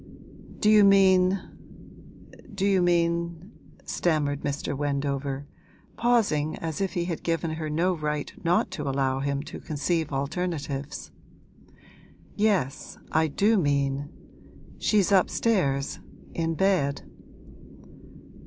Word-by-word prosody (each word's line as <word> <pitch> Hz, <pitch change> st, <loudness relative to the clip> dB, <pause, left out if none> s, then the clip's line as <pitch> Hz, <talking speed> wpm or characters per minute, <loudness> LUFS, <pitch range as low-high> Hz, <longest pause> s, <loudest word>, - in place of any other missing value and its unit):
'Do -, -, +1 dB
you 215 Hz, -1 st, +7 dB
mean 190 Hz, -1 st, +5 dB, 1.2 s
do 195 Hz, 0 st, 0 dB
you 195 Hz, -2 st, +3 dB
mean 170 Hz, +1 st, 0 dB
?' -, -, -25 dB
stammered 145 Hz, -4 st, 0 dB
Mr. 145 Hz, 0 st, -3 dB
Wendover, 140 Hz, -1 st, -2 dB, 0.5 s
pausing 210 Hz, -11 st, +1 dB
as 160 Hz, +1 st, -4 dB
if 195 Hz, -, -1 dB
he 175 Hz, -1 st, -1 dB
had 170 Hz, -3 st, -4 dB
given 165 Hz, -1 st, -1 dB
her 155 Hz, -1 st, -4 dB
no 170 Hz, +5 st, +1 dB
right 150 Hz, -3 st, -3 dB
not 175 Hz, +1 st, +2 dB
to 145 Hz, -3 st, -3 dB
allow 135 Hz, -1 st, 0 dB
him 140 Hz, 0 st, -2 dB
to -, -, -8 dB
conceive 155 Hz, +1 st, -2 dB
alternatives. 145 Hz, -1 st, -3 dB, 1.2 s
'Yes, 195 Hz, -10 st, 0 dB
I 160 Hz, 0 st, +3 dB
do 205 Hz, +8 st, +2 dB
mean. 140 Hz, -2 st, 0 dB, 0.7 s
She's 205 Hz, -3 st, +2 dB
upstairs, 180 Hz, -7 st, +1 dB, 0.3 s
in 165 Hz, -1 st, -1 dB
bed.' 170 Hz, -7 st, +1 dB
160 Hz, 110 wpm, -26 LUFS, 145-185 Hz, 1.2 s, you